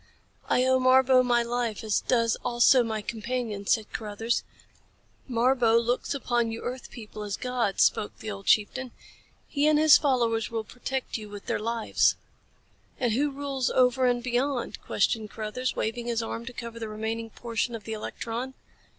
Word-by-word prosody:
"I 250 Hz, -, +3 dB
owe 260 Hz, 0 st, +4 dB
Marbo 255 Hz, 0 st, +5 dB
my 240 Hz, -1 st, +2 dB
life 235 Hz, -2 st, -2 dB
as 215 Hz, -2 st, +1 dB
does 230 Hz, -2 st, +2 dB
also 245 Hz, +2 st, +5 dB
my 220 Hz, -2 st, -2 dB
companion," 225 Hz, -2 st, -4 dB
said 220 Hz, -2 st, +1 dB
Carruthers. 225 Hz, +2 st, -2 dB, 0.9 s
"Marbo 240 Hz, -1 st, +3 dB
looks 240 Hz, +4 st, 0 dB
upon 240 Hz, -4 st, 0 dB
you 225 Hz, -, -6 dB
earth 250 Hz, 0 st, -5 dB
people 215 Hz, -2 st, -9 dB
as 205 Hz, -1 st, -3 dB
gods," 250 Hz, -6 st, +1 dB
spoke 205 Hz, -, +1 dB
the 215 Hz, -, -6 dB
old 200 Hz, -1 st, -8 dB
chieftain. 245 Hz, +4 st, +2 dB, 0.5 s
"He 290 Hz, 0 st, +1 dB
and 305 Hz, -1 st, +5 dB
his 310 Hz, 0 st, +7 dB
followers 235 Hz, -5 st, +1 dB
will 225 Hz, -1 st, -3 dB
protect 250 Hz, +2 st, -4 dB
you 210 Hz, -1 st, -9 dB
with 205 Hz, -1 st, -9 dB
their -, -, -1 dB
lives." 230 Hz, +1 st, +1 dB, 0.8 s
"And 245 Hz, -4 st, +1 dB
who 285 Hz, +5 st, +1 dB
rules 275 Hz, -2 st, -2 dB
over 255 Hz, 0 st, +3 dB
and 245 Hz, -1 st, +1 dB
beyond?" 250 Hz, +1 st, -1 dB
questioned 220 Hz, -2 st, 0 dB
Carruthers, 225 Hz, +5 st, -3 dB
waving 235 Hz, +2 st, -2 dB
his 230 Hz, -1 st, 0 dB
arm 230 Hz, +1 st, -5 dB
to -, -, -4 dB
cover 235 Hz, -1 st, -7 dB
the 225 Hz, -1 st, -5 dB
remaining 220 Hz, +1 st, -4 dB
portion 230 Hz, +1 st, -3 dB
of 220 Hz, -, -8 dB
the 220 Hz, -, -5 dB
electron. 235 Hz, +4 st, -5 dB
235 Hz, 170 wpm, -27 LUFS, 225-255 Hz, 0.9 s, his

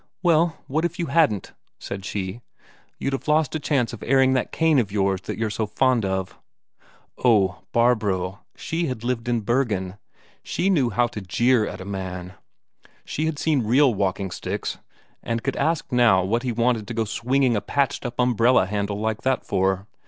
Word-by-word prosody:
"Well, 165 Hz, -1 st, +3 dB
what 155 Hz, +5 st, -1 dB
if 175 Hz, -1 st, -2 dB
you 170 Hz, -, -1 dB
hadn't?" 145 Hz, -, +2 dB, 0.2 s
said 100 Hz, -1 st, -7 dB
she. 95 Hz, +3 st, -4 dB, 0.6 s
"You'd 135 Hz, -, -2 dB
have 135 Hz, -, -4 dB
lost 150 Hz, -2 st, +2 dB
a 155 Hz, -, -1 dB
chance 135 Hz, -6 st, 0 dB
of 110 Hz, -, -8 dB
airing 130 Hz, 0 st, +3 dB
that 130 Hz, -, 0 dB
cane 160 Hz, -3 st, +3 dB
of 105 Hz, -5 st, -1 dB
yours 95 Hz, -2 st, 0 dB
that -, -, -5 dB
you're 110 Hz, -1 st, -1 dB
so 110 Hz, +1 st, -2 dB
fond 120 Hz, +1 st, +2 dB
of." 95 Hz, -1 st, -3 dB, 0.8 s
Oh, 100 Hz, -7 st, +3 dB
Barbro, 105 Hz, -5 st, +1 dB, 0.2 s
she 165 Hz, +1 st, -2 dB
had 125 Hz, -4 st, -5 dB
lived 120 Hz, -1 st, -2 dB
in 120 Hz, -2 st, +1 dB
Bergen, 105 Hz, -5 st, -1 dB, 0.4 s
she 195 Hz, +2 st, 0 dB
knew 140 Hz, -10 st, +2 dB
how 120 Hz, +3 st, +2 dB
to 115 Hz, -3 st, -6 dB
jeer 115 Hz, +5 st, +2 dB
at -, -, -7 dB
a -, -, -7 dB
man; 95 Hz, -2 st, -5 dB, 0.7 s
she 155 Hz, +2 st, -2 dB
had 160 Hz, -2 st, -2 dB
seen 150 Hz, -3 st, +1 dB
real 125 Hz, +4 st, +4 dB
walking 95 Hz, -1 st, -1 dB
sticks, -, -, -4 dB, 0.4 s
and 115 Hz, -1 st, -3 dB
could 135 Hz, -, -1 dB
ask 160 Hz, +2 st, -1 dB
now 120 Hz, -7 st, +4 dB
what 115 Hz, +6 st, 0 dB
he 125 Hz, -1 st, -2 dB
wanted 115 Hz, -2 st, 0 dB
to 120 Hz, -, -5 dB
go 115 Hz, -1 st, 0 dB
swinging 125 Hz, +3 st, +1 dB
a 105 Hz, -, 0 dB
patched 140 Hz, +3 st, -1 dB
up 120 Hz, -2 st, -4 dB
umbrella 125 Hz, -2 st, +4 dB
handle 100 Hz, +1 st, -2 dB
like 110 Hz, 0 st, -2 dB
that 130 Hz, -2 st, 0 dB
for. 95 Hz, +1 st, 0 dB
120 Hz, 185 wpm, -23 LUFS, 100-135 Hz, 0.8 s, real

